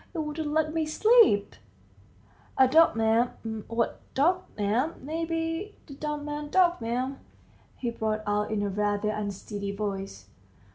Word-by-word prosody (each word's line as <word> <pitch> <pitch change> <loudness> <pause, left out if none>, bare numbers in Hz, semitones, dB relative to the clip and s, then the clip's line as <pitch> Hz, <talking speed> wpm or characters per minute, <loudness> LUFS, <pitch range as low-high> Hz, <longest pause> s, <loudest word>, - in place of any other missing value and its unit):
It - - -3
wouldn't 305 0 -3
let 310 0 +1
me 320 -1 0
sleep!" 430 - +4 1.0
"A 265 - +6
dog, 315 -3 +5
'm... 225 -1 0
what 230 0 -1 0.2
dog, 350 +7 +3 0.2
'm... 220 +10 0
may 325 +3 -2
be, 330 +5 -3
the 285 - -11
dumb 295 +1 -4
man's 295 0 -4
dog, 350 -3 +3
'm," 250 +4 -2 0.6
he 240 -2 -3
brought 215 -1 -2
out 210 0 0
in 210 -2 -1
a 205 - -1
rather 205 +1 0
unsteady 205 -1 -4
voice. 195 - -4
250 Hz, 145 wpm, -27 LUFS, 210-315 Hz, 1.0 s, A